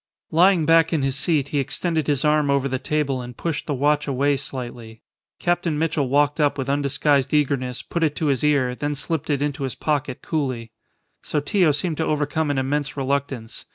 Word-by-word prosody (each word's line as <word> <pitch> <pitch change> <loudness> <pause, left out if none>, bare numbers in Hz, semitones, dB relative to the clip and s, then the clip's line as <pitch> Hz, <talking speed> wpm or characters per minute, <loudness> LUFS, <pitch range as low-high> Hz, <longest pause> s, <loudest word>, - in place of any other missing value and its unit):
Lying 175 0 +4
back 165 0 +4
in 155 -5 +1
his 135 -1 0
seat, 145 -1 0
he 145 - 0
extended 155 +3 -1
his 145 -1 +1
arm 150 -1 +3
over 140 -1 +2
the 130 -1 -2
table 140 -2 -1
and 125 0 -9
pushed 165 -3 -3
the 145 - -1
watch 150 +2 +1
away 140 +1 +2
slightly. 120 -4 -7 0.3
Captain 175 -3 0
Mitchell 150 -4 0
walked 145 +2 +2
up 145 -1 +2
with 135 0 -1
undisguised 140 0 +1
eagerness, 130 -4 0
put 170 - -3
it 155 -2 +1
to 160 - -2
his 140 -3 +1
ear, 140 -4 +2
then 145 +3 -3
slipped 155 +1 -3
it 145 -1 +1
into 145 -1 -3
his 135 -2 -3
pocket 145 -4 -2
coolly. 130 -8 -2 0.5
Sotillo 155 +3 +1
seemed 155 +2 -1
to 160 - 0
overcome 150 +1 0
an 145 - 0
immense 145 +2 -1
reluctance. 135 -4 -3
145 Hz, 190 wpm, -23 LUFS, 135-150 Hz, 0.5 s, Lying